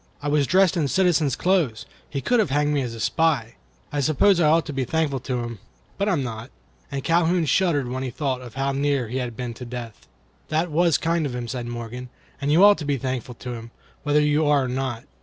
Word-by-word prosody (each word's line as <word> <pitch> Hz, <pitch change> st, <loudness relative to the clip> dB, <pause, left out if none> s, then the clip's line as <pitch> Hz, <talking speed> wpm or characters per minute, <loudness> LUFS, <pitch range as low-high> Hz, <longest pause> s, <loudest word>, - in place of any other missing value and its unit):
I 145 Hz, -, -3 dB
was 145 Hz, -2 st, +2 dB
dressed 190 Hz, -1 st, +4 dB
in 160 Hz, -5 st, +1 dB
citizen's 160 Hz, -5 st, +2 dB
clothes. 170 Hz, -, +1 dB, 0.2 s
He 140 Hz, -, -3 dB
could 245 Hz, -, +2 dB
have 210 Hz, -, +2 dB
had 145 Hz, +2 st, +2 dB
me 145 Hz, -1 st, +1 dB
hanged 135 Hz, -, -1 dB
as 115 Hz, -, -7 dB
a -, -, -9 dB
spy. 140 Hz, -5 st, +1 dB, 0.4 s
I 145 Hz, -, -1 dB
suppose 155 Hz, +7 st, +3 dB
I 155 Hz, -3 st, +4 dB
ought 165 Hz, +1 st, +3 dB
to 150 Hz, -, -5 dB
be 135 Hz, -1 st, -1 dB
thankful 150 Hz, 0 st, 0 dB
to 125 Hz, -1 st, -3 dB
him, 115 Hz, -3 st, -6 dB, 0.4 s
but 200 Hz, +1 st, +1 dB
I -, -, +2 dB
am 145 Hz, -6 st, 0 dB
not." 115 Hz, 0 st, -6 dB, 0.4 s
And 140 Hz, -1 st, -3 dB
Calhoun 170 Hz, 0 st, +2 dB
shuddered 150 Hz, -3 st, +2 dB
when 130 Hz, +1 st, -3 dB
he 130 Hz, -, -3 dB
thought 130 Hz, -2 st, -3 dB
how 135 Hz, +1 st, 0 dB
near 140 Hz, -3 st, 0 dB
he 125 Hz, -, -3 dB
had 120 Hz, -3 st, -4 dB
been 125 Hz, -2 st, -4 dB
to 120 Hz, -, -9 dB
death.(1) 120 Hz, -2 st, -7 dB, 0.5 s
"That 160 Hz, +2 st, 0 dB
was 170 Hz, 0 st, +3 dB
kind 165 Hz, -2 st, 0 dB
of 125 Hz, -, -6 dB
him," 120 Hz, -1 st, -4 dB
said 120 Hz, -1 st, -4 dB
Morgan; 120 Hz, +1 st, -6 dB, 0.3 s
"and 140 Hz, +1 st, 0 dB
you 170 Hz, +6 st, +6 dB
ought 205 Hz, 0 st, +7 dB
to -, -, -4 dB
be 145 Hz, -1 st, 0 dB
thankful 130 Hz, -2 st, -4 dB
to 125 Hz, +1 st, -6 dB
him, 115 Hz, 0 st, -8 dB, 0.3 s
whether 150 Hz, 0 st, +2 dB
you 150 Hz, +1 st, +2 dB
are 145 Hz, -2 st, +4 dB
or -, -, -2 dB
not. 125 Hz, -2 st, -3 dB
140 Hz, 240 wpm, -24 LUFS, 125-160 Hz, 0.5 s, ought